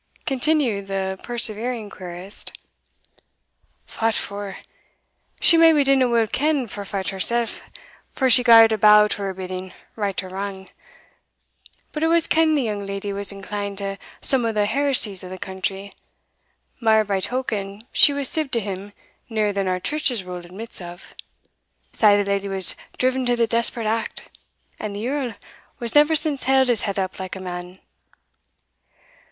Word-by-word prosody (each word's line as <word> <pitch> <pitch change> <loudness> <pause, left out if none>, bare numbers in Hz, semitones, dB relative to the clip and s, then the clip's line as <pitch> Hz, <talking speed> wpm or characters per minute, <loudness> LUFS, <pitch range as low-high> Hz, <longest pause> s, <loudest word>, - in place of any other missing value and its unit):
continued 265 -7 0
the 190 -1 -3
persevering 235 -1 -2
querist. 185 0 -7 1.3
"Fat 225 0 -1
for! 200 -1 -4 0.8
she 335 - +6
maybe 325 -3 +6
didna 270 -2 +3
weel 230 -1 +3
ken 285 +4 0
for 205 -2 -7
fat 195 -1 -3
hersell, 235 +5 0 0.7
for 265 - 0
she 250 0 +6
gar'd 225 -2 +7
a' 220 - 0
bow 210 0 +7
to 205 - -3
her 195 -1 -2
bidding, 185 0 -6 0.2
right 200 -3 -2
or 185 - -9
wrang 190 0 -6 1.2
But 300 - -5
it 320 - +3
was 335 0 +3
ken'd 315 -1 +3
the 275 - 0
young 210 -3 -3
leddy 200 0 -5
was 200 0 +1
inclined 200 0 -5
to 195 0 -5 0.2
some 265 -3 +1
o' 230 - 0
the 210 -1 +1
heresies 225 -5 0
of 185 - -8
the 185 - -7
country 190 +1 -5 0.9
mair 220 -2 +4
by 200 -1 -1
token, 210 -3 -3
she - - +6
was 280 -1 -1
sib 310 0 0
to 235 - +2
him 200 -1 -6 0.4
nearer 215 -2 0
than 195 -1 -1
our 185 0 0
Church's 255 -3 -1
rule 180 -1 -7
admits 185 +5 -4
of. 175 +1 -11 0.8
Sae 205 -2 +5
the 205 - 0
leddy 200 0 -1
was 190 -2 +5 0.2
driven 260 +1 +1
to 245 - +2
the 235 -1 +2
desperate 230 0 0
act, 225 +1 -3 0.5
and 210 -1 -5
the 210 +3 -4
yerl 260 -4 -2 0.4
has 235 -2 -1
never 300 +2 +5
since 300 -3 +2
held 265 -1 +3
his 235 -3 +3
head 200 - -4
up 190 -1 -3
like 190 0 -5
a - - -7
man." 180 0 -7
210 Hz, 160 wpm, -22 LUFS, 195-250 Hz, 1.3 s, gar'd